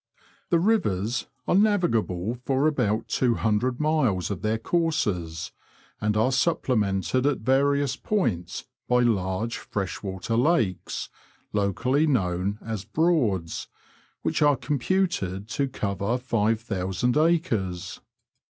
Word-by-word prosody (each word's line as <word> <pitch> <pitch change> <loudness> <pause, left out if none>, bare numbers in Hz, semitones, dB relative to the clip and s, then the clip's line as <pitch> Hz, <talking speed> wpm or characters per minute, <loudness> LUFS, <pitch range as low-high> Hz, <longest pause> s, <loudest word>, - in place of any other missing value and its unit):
The 170 - +4
rivers 120 - +1 0.2
are - - +2
navigable 125 - +1
for 135 +2 +1
about 115 -8 +1
two 120 -3 +1
hundred 115 +4 0
miles 135 - +1
of 95 - -4
their 110 +1 0
courses, 105 - -1 0.5
and 105 0 0
are 120 +5 +3
supplemented 125 - +1
at 145 -5 0
various 140 +3 +2
points 115 - -2 0.2
by 125 0 +3
large 110 0 0
fresh 100 -3 -4
water 95 +3 -3
lakes, 115 - 0 0.4
locally 125 - +1
known 95 - 0
as 110 -4 -4
Broads," 110 - 0 0.6
which - - 0
are 145 -1 +5
computed 140 - -1
to 140 +2 0
cover 100 -2 -2
five 115 -3 +1
thousand 100 +2 -1
acres. 115 - 0
115 Hz, 115 wpm, -26 LUFS, 100-140 Hz, 0.6 s, are